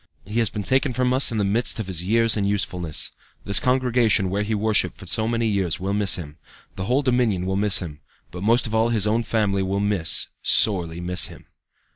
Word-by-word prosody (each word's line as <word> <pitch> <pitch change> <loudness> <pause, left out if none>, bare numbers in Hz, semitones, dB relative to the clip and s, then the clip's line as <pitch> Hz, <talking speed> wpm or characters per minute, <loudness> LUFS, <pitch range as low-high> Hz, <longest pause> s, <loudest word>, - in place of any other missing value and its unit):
"He 105 +4 -2
has 115 -3 +1
been 105 - -5
taken 130 +3 +1
from 125 0 0
us 130 0 +3
in 115 - -3
the 105 - +1
midst 110 +4 0
of 110 - -3
his 90 -3 -2
years 115 +3 +2
and 100 -2 0
usefulness. 90 -6 -2 0.3
This 100 - +4
congregation 125 -6 +1
where 100 +2 -1
he 105 +1 -2
worshipped 105 0 0
for - - -12
so 110 0 +1
many 115 0 -1
years 100 -6 -1
will 95 +2 -3
miss 100 -2 +3
him; 75 -3 -9 0.4
the 95 - -5
whole 130 +6 +1
Dominion 120 -8 +1
will 95 +1 -2
miss 105 0 +3
him; 75 -5 -5 0.3
but 90 +2 -8
most 115 +5 +3
of 110 - -5
all 110 +1 +2
his 110 -4 +2
own 110 +2 +1
family 105 -3 0
will 95 +1 -1
miss, 100 -5 0
sorely 85 -6 +2
miss 90 +1 +1
him. - - -14
105 Hz, 220 wpm, -22 LUFS, 95-115 Hz, 0.4 s, This